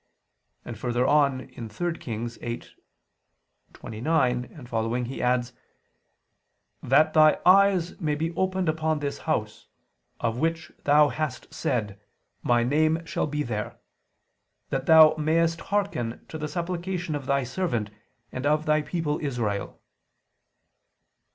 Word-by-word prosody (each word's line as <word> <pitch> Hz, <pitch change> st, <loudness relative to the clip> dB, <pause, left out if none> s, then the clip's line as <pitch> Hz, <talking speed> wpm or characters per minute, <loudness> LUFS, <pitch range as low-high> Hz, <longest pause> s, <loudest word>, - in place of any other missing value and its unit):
And 115 Hz, -3 st, -7 dB
further 120 Hz, +1 st, 0 dB
on 140 Hz, -3 st, +2 dB
(3 120 Hz, +10 st, -4 dB
Kings 115 Hz, 0 st, -5 dB
8:29, 125 Hz, +3 st, -5 dB
20) 115 Hz, +1 st, -1 dB
he 125 Hz, +3 st, -5 dB
adds: 125 Hz, 0 st, +1 dB, 1.3 s
"That 155 Hz, +5 st, +3 dB
Thy 155 Hz, -1 st, +5 dB
eyes 190 Hz, -1 st, +4 dB
may 150 Hz, -3 st, 0 dB
be 165 Hz, +3 st, -3 dB
open 190 Hz, 0 st, 0 dB
upon 155 Hz, 0 st, 0 dB
this 145 Hz, -1 st, -4 dB
house... -, -, -2 dB, 0.5 s
of 115 Hz, 0 st, -1 dB
which 165 Hz, +2 st, -1 dB
Thou 145 Hz, +1 st, +5 dB
hast 150 Hz, -4 st, -4 dB
said: 105 Hz, -4 st, -2 dB, 0.4 s
My 120 Hz, -1 st, +2 dB
name 155 Hz, +5 st, +1 dB
shall -, -, -1 dB
be 150 Hz, 0 st, -2 dB
there;... 105 Hz, -5 st, -4 dB, 0.9 s
that -, -, -2 dB
Thou 160 Hz, -1 st, +8 dB
mayest 165 Hz, +2 st, +1 dB
hearken 200 Hz, -, -2 dB
to 160 Hz, -, -6 dB
the 150 Hz, -, -3 dB
supplication 175 Hz, 0 st, -3 dB
of 140 Hz, -3 st, -5 dB
Thy 140 Hz, 0 st, +2 dB
servant 120 Hz, -, -2 dB, 0.4 s
and 130 Hz, +2 st, -3 dB
of 150 Hz, +1 st, +2 dB
Thy 155 Hz, 0 st, +3 dB
people 150 Hz, -1 st, -2 dB
Israel." 115 Hz, -9 st, -3 dB
150 Hz, 120 wpm, -26 LUFS, 120-165 Hz, 1.3 s, Thou